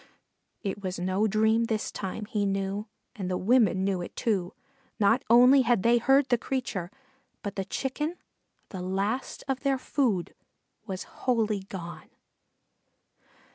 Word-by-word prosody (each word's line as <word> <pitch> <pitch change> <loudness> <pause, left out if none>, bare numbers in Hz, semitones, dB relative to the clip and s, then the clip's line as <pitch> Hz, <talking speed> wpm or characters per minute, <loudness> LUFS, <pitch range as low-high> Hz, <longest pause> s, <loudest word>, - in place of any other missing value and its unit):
It 200 -1 -3
was 185 -1 -3
no 185 +4 +1
dream 220 +2 +3
this 220 -1 -2
time, 200 +2 -5
he 210 0 -1
knew, 195 +2 -1 0.3
and 190 -3 -4
the 180 - 0
women 205 -3 +3
knew 190 -2 0
it, 175 - -8
too; 190 -6 -1 0.4
not 215 +3 +4
only 250 +4 +7
had 235 -5 +2
they 235 +1 +5
heard 270 +3 +4
the 245 -2 +3
creature, 225 -11 -3 0.5
but 200 -1 -4
the 195 -2 -2
Chicken, 295 - -3 0.5
the 185 - -6
last 195 +7 -2
of 270 -1 -1
their 275 -1 +1
food, 245 - 0 0.5
was 190 -2 -4
wholly 225 -5 0
gone. 170 -3 -8
210 Hz, 140 wpm, -28 LUFS, 190-245 Hz, 0.5 s, only